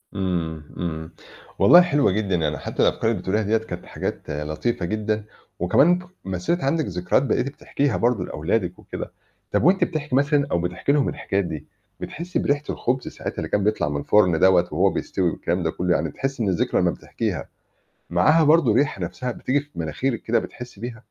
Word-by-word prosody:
إمم، 85 -5 -2
إمم، 80 -2 -4 0.5
والله 175 - +9
حلوة 145 - +2
جدًا 100 -2 0
يعني 75 -3 0
حتّى - - -3
الأفكار - - +2
اللي - - -2
بتقوليها 105 +4 0
ديّة 110 +3 +2
كانت 110 - -7
حاجات - - -5
لطيفة 75 +8 -2
جدًا، 110 +2 -1 0.4
وكمان 155 - +4 0.3
مثّلت 95 - -1
عندِك 155 +3 +1
ذكرات 90 +7 +1
بقيتِ 135 - 0
بتحكيها 140 -1 -1
برضه 120 -6 +1
لأولادِك - - -2
وكده، - - -7 0.4
طب - - +1
وأنتِ 185 +4 +4
بتحكي 150 -5 -2
مثلًا 140 0 +3
أو 85 - +2
بتحكي 90 +10 -1
لهم 145 -2 +2
الحكايات 95 -1 -1
دي، 75 -3 -6 0.3
بتحسّي 175 +3 -4
بريحة 145 +1 0
الخبز 125 +1 -1
ساعات - - -6
اللي - - -3
كان 100 - +1
بيطلع 105 -7 +1
من 70 0 -2
الفرن 90 -4 +3
دوّة 90 -1 +5
وهو 95 +5 +3
بيستوي 90 -2 -1
والكلام 85 +2 -2
ده 80 - 0
كلّه؟ 90 0 0
يعني - - 0
بتحسّي 135 -4 -3
إن 100 - +1
الذكرى 90 - +1
لما - - +3
بتحكيها، - - -4 0.6
معاها 150 - +4
برضه 150 -5 +5
ريحة 130 -7 +1
نفْسها 125 +8 -3
بتيجي 140 +5 0
في 145 - -15
مناخيرِك 105 - -2
كده 115 +1 +2
بتحسّي 125 -4 -8
بيها؟ 115 -1 -6
105 Hz, 180 wpm, -23 LUFS, 90-140 Hz, 0.6 s, والله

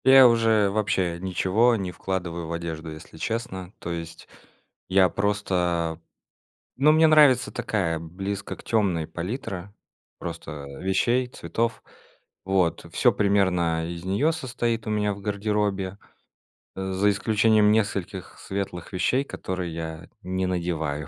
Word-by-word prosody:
Я 130 -1 +9
уже 115 -3 +3
вообще 95 -5 0
ничего 95 +6 +2
не 95 -4 -3
вкладываю 85 -3 -4
в - - -6
одежду, 80 -1 -5
если 80 +1 -11
честно. 95 -3 -4
То 85 - -6
есть 85 -1 -7 0.6
я 95 -1 +5
просто 90 -5 0 0.8
Ну, 150 +4 +5
мне 160 +1 +6
нравится 145 -5 +5
такая 95 -9 -1
близко 95 +5 -5
к - - -15
тёмной 95 -8 +1
палитра 100 - -5 0.4
просто 75 -2 -6 0.2
вещей, 120 +7 +2
цветов, 115 -2 -2 0.6
вот. 95 -3 +1
Всё - - +4
примерно 90 -5 +2
из 85 0 -6
нее 120 +13 +2
состоит 120 -6 -2
у - - -2
меня 105 -1 +1
в 100 - -11
гардеробе, 100 -2 -1 0.8
э, 95 0 -3
за 100 +2 +3
исключением 105 0 +3
нескольких 100 -3 -1
светлых 95 -2 -5
вещей, 125 +8 +1
которые 90 -8 -4
я 80 0 -6
не 95 +1 -1
надеваю, 80 -5 -2
95 Hz, 130 wpm, -25 LUFS, 85-110 Hz, 0.8 s, Я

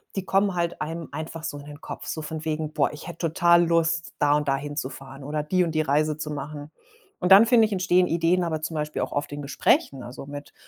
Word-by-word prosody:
die 195 -2 -3
kommen 195 +1 +2
halt 170 -1 -1
einem 165 +1 -4
einfach 160 +2 -6
so 160 -3 -4
in 145 - -10
den 145 +1 -11
Kopf, - - -7
so 160 - -4
von 155 +1 -6
wegen: 155 -1 -2
„Boah, - - +1
ich 150 - -9
hätte 170 -1 -3
total 170 0 +5
Lust, 165 0 +1
da 145 0 +4
und 150 -1 -3
da 135 - +3
hinzufahren 135 -1 -6
oder 150 +2 -2
die 180 +4 +2
und 170 - -1
die 155 - +2
Reise 150 +1 +1
zu 155 0 -5
machen.“ 145 +1 -6 0.5
Und 180 - -1
dann 205 +4 +9
finde 230 -2 +6
ich, 215 - -4
entstehen 185 -1 +3
Ideen 170 +2 +2
aber 160 -2 -2
zum 160 +1 -4
Beispiel 150 0 -2
auch - - -2
oft 145 0 -2
in 145 0 -5
Gesprächen, 140 -1 +1
also, 125 +3 -9
mit 145 0 -9
155 Hz, 240 wpm, -25 LUFS, 145-170 Hz, 0.5 s, dann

